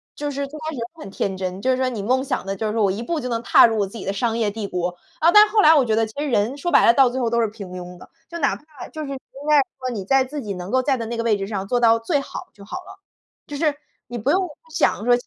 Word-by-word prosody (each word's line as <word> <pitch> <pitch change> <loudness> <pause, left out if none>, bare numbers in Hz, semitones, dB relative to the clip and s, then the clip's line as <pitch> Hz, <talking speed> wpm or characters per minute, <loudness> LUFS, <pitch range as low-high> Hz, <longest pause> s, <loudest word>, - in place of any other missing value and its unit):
就 290 0 -3
是 280 0 -3
最 300 +3 -10
开 315 - -4
始 - - -7
就 230 - -2 0.2
很 195 - -8
天 195 -1 -2
真， 185 +1 -4
就 260 - 0
是 255 - +1
说 260 0 +1
你 230 -5 -4
梦 255 +6 +1
想 265 - -3
的 195 0 -3
就 220 - -4
是 210 - -2
说 225 - 0
我 195 - +3
一 205 +5 -4
步 330 +6 -2
就 250 - -4
能 230 0 -2
踏 - - +7
入 225 - -1
我 200 - +2
自 215 - -10
己 200 - -7
的 195 - -1
商 225 +3 -1
业 220 -3 +1
帝 205 -1 -5
国。 180 -1 -3 0.2
啊， 335 +2 +5
但 420 +2 +9
是 - - -13
后 430 - +5
来 315 -2 +7
我 285 - +5
觉 220 -2 +1
得 225 0 +2
其 220 - -14
实 300 - -1
人 235 +4 +1
说 345 +5 -2
白 - - +6
了， 230 - +7
到 265 0 +5
最 255 +2 -3
后 235 - +1
都 235 - +1
是 225 - +2
平 205 -3 -9
庸 180 0 -8
的， - - -15 0.2
就 340 - -6
哪 280 - +1
怕 300 -3 -12
就 310 - -7
是 285 - -6
应 270 - -4 0.3
该 300 - +6 0.2
说 255 - -3
你 200 - -4
在 270 +3 +4
自 290 +3 -6
己 205 -4 -4
能 180 +1 -7
够 260 +1 +3
在 270 +1 +1
的 230 - -4
那 235 0 -4
个 - - 0
位 220 -3 +2
置 195 - -4
上 195 -2 -4
做 245 +2 +1
到 230 -1 +4
最 285 +6 0
好 - - -8
就 200 - -15
好 210 - -6
了。 385 +1 -12 0.5
就 290 - -6
是 300 -1 +1 0.3
你 240 +1 -6
不 250 +6 0
用 370 +1 +2 0.3
想 310 - +1
说 245 - +5
235 Hz, 360 characters per minute, -22 LUFS, 205-285 Hz, 0.5 s, 但